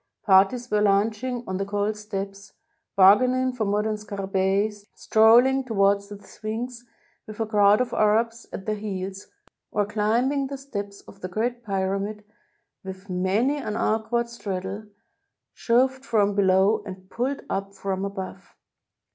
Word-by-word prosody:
Parties 210 +5 +4
were 210 0 +2
lunching 215 +5 +1
on 185 - -3
the 195 - -1
cold 205 +1 -1
steps, 200 -2 -6 0.4
bargain 205 +6 +6
ing 255 0 0
for 230 -3 -2
modem 210 +1 0
scarabcBi, 195 0 -1 0.2
strolling 240 +5 +5
towards 200 -4 +1
the 205 0 -9
Sphinx 225 +4 -6 0.4
with 215 0 -10
a 225 - +1
crowd 210 0 +4
of 250 - -2
Arabs 225 +2 +1
at 190 - -7
their 215 - 0
heels, 195 -2 -5 0.4
or 205 -1 0
climbing 235 +7 0
the 275 0 -6
steps 205 -7 -7
of 195 - -16
the 185 - -4
Great 235 +6 -2
P^Tamid 200 +1 -2 0.6
with 190 0 -9
many 200 +10 +1
an 215 -7 -4
awkward 225 +2 0
straddle, 200 -2 -5 0.7
shoved 260 +3 +1
from 210 -4 +2
below 195 +2 +3
and 185 -2 -10
pulled 265 +4 -2
up 195 0 -4
from 190 0 -3
above. 195 -1 -7
210 Hz, 140 wpm, -25 LUFS, 195-235 Hz, 0.7 s, bargain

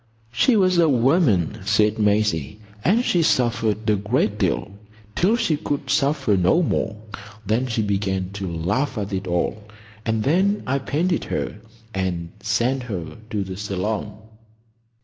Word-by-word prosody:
"She 175 - +3
was 185 -3 +3
a 165 -2 +5
woman," 125 - +2
said 105 +2 +2
Maisie, 105 -6 +1 0.2
"and 230 +7 +3
she 175 - +2
suffered 115 -7 +1
a 105 - +4
great 105 +1 0
deal,—till 105 - -1
she 165 -10 +1
could 145 -3 -3
suffer 140 -6 +2
no 95 - +3
more. 105 -8 -1 0.5
Then 115 +6 +1
she 115 -2 -1
began 95 -2 -1
to 100 -3 -5
laugh 105 - -1
at 100 -1 -3
it 95 0 -3
all, 90 +4 -1 0.4
and 110 -1 0
then 190 - +2
I 135 +2 0
painted 165 +6 -1
her - - -3 0.4
and 90 -3 -2
sent 115 +6 0
her 90 -3 -5
to 105 -2 -1
the 95 -1 -6
Salon." 105 +1 -3
110 Hz, 145 wpm, -22 LUFS, 100-140 Hz, 0.5 s, a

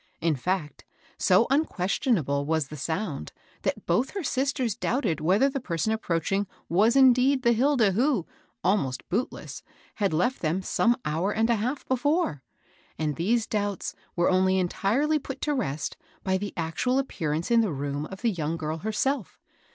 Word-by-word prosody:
In 165 -1 +2
&ct, 155 +2 -3 0.4
so - - +5
unquestionable 190 - +1
was 160 -3 0
the 150 - -7
sound, 160 - -3 0.3
that - - -2
both 235 +10 +1
her 395 - -2
sisters 260 -4 0
doubted 225 - 0
whether 190 - +4
the 275 0 -2
person 220 0 -1
aj^roaching 195 0 -1 0.2
was 210 +8 +3
indeed 260 0 +5
the 235 - +5
Hilda, 245 -3 +3
who, 235 - +1 0.4
almost 145 -9 0
bootless, 230 +8 -3 0.4
had 200 -3 +1
left 180 +12 0
them 170 +4 0
some 240 +5 +2
hour 165 +7 0
and 225 +2 +2
a - - +4
half 250 +7 -3
before; 260 - +1 0.6
and 150 -2 -1
these 220 +7 +1
doubts 205 -3 -2 0.2
were 175 +1 +3
only 185 0 +3
entirely 230 - +1
put 270 -1 -7
to 300 - 0
rest 155 - -2 0.3
by 190 -1 +1
the 200 +1 -2
actual 170 +10 0
appearance 165 - -2
in 230 -1 +6
the 215 -5 0
room 145 +1 -3
of 190 0 -10
the 230 - +3
young 165 -3 -2
girl 155 0 -3
herself. 220 - -1
200 Hz, 160 wpm, -27 LUFS, 165-250 Hz, 0.6 s, in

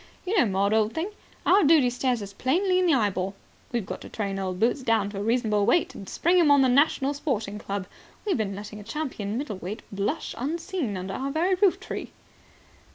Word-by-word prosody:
You 385 +4 0
know, 335 - +4
Maud, 200 +1 +1
old 220 0 +2
thing, 340 +6 -2 0.3
our 400 - +5
duty 290 -5 +5
stares 245 -2 0
us 200 0 -9
plainly 365 - +1
in 365 - +2
the 330 - +4
eyeball. 195 -4 0 0.4
We've 235 -5 -1
got - - -6
to - - -9
train 200 -3 -3
old 185 -1 -3
Boots 240 +5 +2
down 225 -4 +1
to 200 - -5
a - - -2
reasonable 220 -2 +1
weight 315 +8 +3
and 195 - -9
spring 355 +2 +2
him 325 -4 +5
on 285 -1 +6
the 260 - +4
National 280 +1 +3
Sporting 225 -8 -2
Club. 200 -2 -4 0.4
We've 405 - +1
been 205 -4 -2
letting 210 +1 -8
a - - -9
champion 225 -4 -4
middleweight 210 - -5
blush 200 +10 -2
unseen 320 - -2
under 185 +1 -5
our 270 +6 -3
very 335 +6 +1
roof 375 0 +3
tree." - - -6
240 Hz, 210 wpm, -26 LUFS, 205-310 Hz, 0.4 s, on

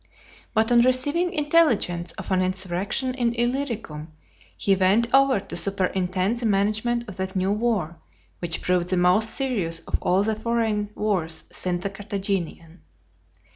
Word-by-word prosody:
But 220 +2 +2
on 240 -1 +6
receiving 285 +8 +2
intelligence 295 - +2
of - - -8
an 185 -1 +2
insurrection 190 +7 -1
in 240 -2 0
Illyricum, 235 - -3 0.5
he 195 - +2
went 200 +6 +2
over 270 -4 +4
to - - -8
superintend 190 +1 0
the 235 -1 0
management 220 +4 0
of 205 - -9
that 190 0 -4
new 190 +1 +1
war, 210 -7 -1 0.4
which 170 -2 -3
proved 180 -1 +1
the 185 - 0
most 180 +5 +4
serious 200 -13 -1
of - - -3
all 185 +2 +2
the 220 +1 0
foreign 220 -2 -1
wars 180 -7 -1
since 180 -1 -2
the 200 - -3
Carthaginian. 195 -5 -4
200 Hz, 145 wpm, -24 LUFS, 185-235 Hz, 0.5 s, on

